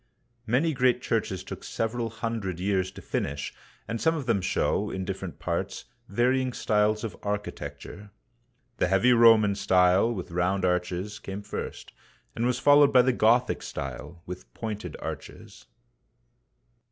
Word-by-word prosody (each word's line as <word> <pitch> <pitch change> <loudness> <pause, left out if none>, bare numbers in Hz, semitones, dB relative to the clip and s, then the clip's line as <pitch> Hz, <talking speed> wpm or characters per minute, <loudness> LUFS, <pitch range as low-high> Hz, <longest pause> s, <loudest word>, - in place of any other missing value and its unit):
Many 140 +8 +2
great 125 -2 +3
churches 95 -5 -1
took - - -8
several 115 +1 -2
hundred 115 -5 -4
years 95 -1 0
to 95 - -11
finish, 70 0 -3 0.3
and 115 0 -3
some 160 0 +3
of 145 -5 -4
them 115 -6 +1
show, 90 - 0
in 95 0 -4
different 95 -2 -5
parts, 90 +2 -3 0.2
varying 125 +4 +1
styles 105 0 +1
of 115 - -4
architecture. 105 0 -5 0.7
The - - +2
heavy 95 +7 +4
Roman 115 -3 +6
style, 95 +3 +3
with 95 -6 -5
round 90 +2 +1
arches, 90 +3 -1
came 100 +1 -7
first, - - -6 0.4
and 115 +2 0
was 125 -1 +1
followed 145 +1 +6
by 125 -1 +6
the 130 0 +2
Gothic 120 +2 +3
style, 70 +6 -7
with 90 +1 -9
pointed 105 -7 -5
arches. - - -8
105 Hz, 140 wpm, -27 LUFS, 95-120 Hz, 0.7 s, Roman